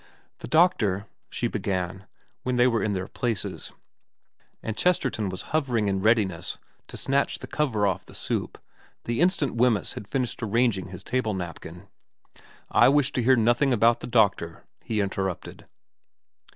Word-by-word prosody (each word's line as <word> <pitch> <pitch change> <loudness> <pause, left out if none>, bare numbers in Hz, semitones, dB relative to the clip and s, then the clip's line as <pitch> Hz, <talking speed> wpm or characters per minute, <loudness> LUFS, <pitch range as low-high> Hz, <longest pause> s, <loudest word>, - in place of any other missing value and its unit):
' - - -40
The - - -7
doctor 110 - +3
' - - -55
she - - -3
began, 95 -2 -3 0.3
when 125 0 -1
they 120 0 +4
were 115 -3 +2
in 105 - 0
their 95 0 -3
places, 115 -6 -3 0.9
and 110 - -3
Chesterton 130 - +1
was 95 -1 -6
hovering 125 -9 +1
in 95 -1 0
readiness 105 -6 +1 0.3
to - - -7
snatch 140 +1 0
the - - -8
cover 120 -9 0
off 95 -1 -1
the - - -13
soup - - -3 0.5
the 120 +5 -1
instant 175 -6 +2
Wemyss 115 -5 +2
had 100 - -8
finished 125 -1 -2
arranging 110 -4 +1
his 90 -1 -9
table 115 -4 -1
napkin. 90 0 -7 0.4
' - - -24 0.3
I - - +6
wish 145 0 +3
to 130 - -1
hear 130 +2 +5
nothing 120 +4 +3
about 115 +1 +4
the - - -7
doctor,' 100 -8 +1 0.2
he 110 -2 -1
in 100 -1 -1
terrupted. 95 -3 -4
110 Hz, 165 wpm, -26 LUFS, 95-125 Hz, 0.9 s, I